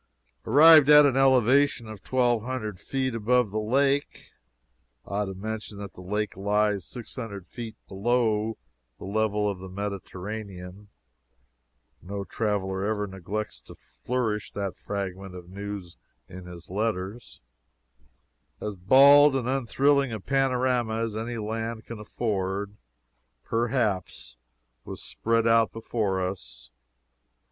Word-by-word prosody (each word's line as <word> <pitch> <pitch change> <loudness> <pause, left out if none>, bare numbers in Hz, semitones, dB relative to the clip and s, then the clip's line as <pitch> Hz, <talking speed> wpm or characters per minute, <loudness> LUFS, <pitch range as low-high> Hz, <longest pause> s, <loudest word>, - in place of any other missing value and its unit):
Arrived 150 +3 +8
at 150 0 +9
an 135 -3 +2
elevation 135 -1 +4
of 110 -2 -9
twelve 120 -3 +1
hundred 110 -6 -4
feet 130 -2 -2
above 115 0 +2
the 110 - -1
lake, 135 +6 0 0.7
(I - - -15
ought 105 - +1
to 95 -1 -6
mention 105 +1 -6
that 100 -2 -8
the - - -12
lake 105 +3 -2
lies 100 -1 +1
six 120 +2 -9
hundred 100 -7 -6
feet 110 +3 -8
below 110 +1 0 0.4
the - - -9
level 105 +1 0
of 100 -2 -3
the 95 0 -9
Mediterranean 100 0 -6 1.1
no 100 +2 -5
traveler 95 -2 -2
ever 105 0 -1
neglects 100 +2 -5
to - - -14
flourish 115 -4 -3
that 100 -2 -3
fragment 95 -2 -5
of 90 0 -11
news 100 -3 -7 0.3
in 90 0 -10
his 85 -1 -11
letters,) 105 +2 -3 1.2
as 105 - -4
bald 135 +9 +7
and 125 -3 -1
unthrilling 135 +1 +2
a 110 - -4
panorama 125 -2 +1
as 115 -1 -2
any 115 +2 -4
land 110 +1 -4
can 115 -2 -8
afford, 100 -2 -3 0.7
perhaps, 115 - -1 0.5
was - - -8
spread 115 0 0
out 115 -1 +4
before 100 -5 -1
us. - - -9
110 Hz, 125 wpm, -26 LUFS, 100-120 Hz, 1.2 s, at